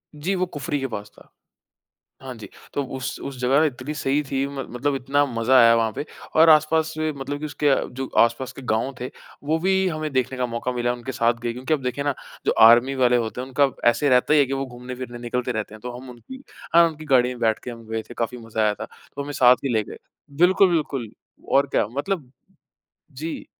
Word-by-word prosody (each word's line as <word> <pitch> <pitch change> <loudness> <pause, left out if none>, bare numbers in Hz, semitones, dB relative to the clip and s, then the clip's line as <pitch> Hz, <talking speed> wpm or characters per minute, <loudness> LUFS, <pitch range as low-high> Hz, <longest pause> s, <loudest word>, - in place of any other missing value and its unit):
जी, 170 +7 -2
वो 185 0 0
कुफरी 145 -3 -4
के 135 - -2
पास 105 -3 -7
था। - - -19 0.9
हाँ 130 -1 -7
जी, 110 - -10 0.2
तो 145 - -1
उस 130 - -5
उस 135 -2 -7
जगह 135 +5 +3
इतनी 135 +2 -6
सही 145 0 0
थी 135 0 -1
मत 140 -2 -6
मतलब 135 +3 -1
इतना 140 +2 +1
मज़ा 120 0 +1
आया 115 0 +7
वहाँ 115 -1 +1
पे 150 - -4 0.3
और 160 +1 +7
आस-पास 160 +1 +4
में 155 0 0
मतलब 145 +2 -4
कि 155 - -4
उसके 145 0 0 0.3
जो 135 0 -3
आस-पास 115 +2 +3
के - - -9
गाँव 120 +2 -1
थे, 125 - -4 0.3
वो 155 +3 +1
भी 190 +1 +2
हमें 155 -2 -3
देखने 130 0 0
का 125 - 0
मौका 115 +1 -3
मिला, 120 0 0
उनके 125 +2 -6
साथ 120 -1 +2
गए 120 - -1
क्योंकि 130 +6 -2
अब 145 - 0
देखिए 125 +3 -2
ना, 145 -1 0 0.3
जो - - +3
आर्मी 120 +4 +6
वाले 125 -1 +3
होते 115 +1 -3
हैं 130 - -6
उनका 135 +1 +2 0.2
ऐसे 130 +5 +1
रहता 125 +4 +4
ही 150 - +6
है 140 - +5
कि 135 - -4
वो 135 0 -2
घूमने-फिरने 125 0 -8
निकलते 125 +1 -2
रहते 110 -2 -4
हैं। 105 - -15
तो 125 - -5
हम 130 +1 -11
उनकी 260 - -11 0.3
हाँ, 170 0 +8
उनकी 155 0 -10
गाड़ी 130 -4 +4
में 125 -1 -7
बैठके 115 +2 0
हम 115 -1 -11
गए 110 0 -3
थे, - - -8
काफ़ी 120 +1 -3
मज़ा 115 -1 -4
आया 105 - +2
था। 110 - -6 0.3
तो 140 - -3
हमें 145 +1 -6
साथ 125 -1 +6
ही 130 - 0
ले 110 -1 +2
गए - - -10
थे। 140 - -23
बिल्कुल, 185 +2 +5
बिल्कुल। 135 -8 -2 0.4
और 140 +1 +4
क्या - - +2
मतलब 140 - -4 0.8
जी। 155 +4 -6
130 Hz, 230 wpm, -23 LUFS, 120-145 Hz, 0.9 s, हाँ